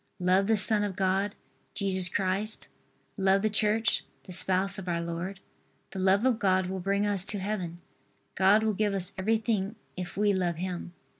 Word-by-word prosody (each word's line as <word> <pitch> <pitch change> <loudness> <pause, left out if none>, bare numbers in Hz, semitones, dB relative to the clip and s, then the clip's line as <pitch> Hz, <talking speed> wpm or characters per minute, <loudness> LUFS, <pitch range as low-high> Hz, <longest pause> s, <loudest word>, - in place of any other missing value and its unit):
Love 185 +2 +2
the 220 -1 +3
Son 210 +1 +5
of 200 -3 -3
God, 195 +2 0 0.4
Jesus 190 -3 +2
Christ, 195 +3 -1 0.5
love 195 0 +2
the 215 - +1
Church, 215 +2 +1 0.2
the 185 - -11
Spouse 190 +2 +2
of 190 - -9
our 170 -1 -1
Lord. 170 +3 -5 0.5
The 190 - -6
love 190 +4 +3
of 245 -4 +2
God 185 -2 +2
will 190 +1 -4
bring 200 +2 0
us 200 -3 +2
to 205 - -3
Heaven. 185 -4 -4 0.5
God 195 +3 +4
will 220 -1 +1
give 205 0 0
us 185 0 -2
everything 215 0 -1 0.2
if 180 0 -7
we 205 0 +3
love 180 -3 0
Him. 180 0 -5
195 Hz, 175 wpm, -28 LUFS, 185-210 Hz, 0.5 s, Son